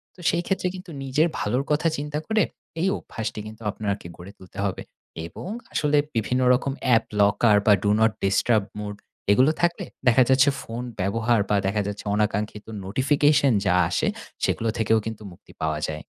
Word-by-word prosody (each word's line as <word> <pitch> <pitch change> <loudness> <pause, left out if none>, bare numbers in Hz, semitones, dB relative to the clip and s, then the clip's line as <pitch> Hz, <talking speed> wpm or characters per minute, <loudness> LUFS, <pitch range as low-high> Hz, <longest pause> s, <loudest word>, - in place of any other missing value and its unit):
তো - - -21
সেই 170 0 0
ক্ষেত্রে 190 -1 0
কিন্তু 180 -1 -9
নিজের 135 +5 +2
ভালোর 125 +6 0
কথা 150 +3 +2
চিন্তা 150 +1 -3
করে, 220 -2 +3 0.4
এই 185 - +2
অভ্যাসটি 110 -1 -5
কিন্তু 110 +1 -11
আপনাকে 100 -3 -4
গড়ে 90 +3 -10
তুলতে 95 - -15
হবে। 95 - -2 0.5
এবং 85 - -9 0.3
আসলে 150 0 +2 0.2
বিভিন্ন 120 +3 0
রকম 135 +2 0 0.2
app 115 - +3 0.2
locker 105 +2 +4
বা 105 - +7
Do - - +3
Not 110 0 +4
Disturb 100 +2 +2 0.2
mode 105 -1 -6 0.3
এগুলো 130 +8 +5
থাকলে 175 0 +1 0.2
দেখা 125 +1 +6
যাচ্ছে 135 +2 +5
ফোন 115 +2 -6 0.2
ব্যবহার 110 +5 +1
বা 105 - +3
দেখা 105 +2 0
যাচ্ছে 100 +1 -6
অনাকাঙ্ক্ষিত 105 0 -1 0.2
নোটিফিকেশন 140 +5 +3
যা 90 - +3
আসে, - - 0 0.4
সেগুলো 115 - +1
থেকেও 110 0 +3
কিন্তু 110 -1 -6
মুক্তি 85 - -17
পাওয়া 80 -1 0
যায়। 75 0 -5
115 Hz, 170 wpm, -24 LUFS, 105-140 Hz, 0.5 s, বা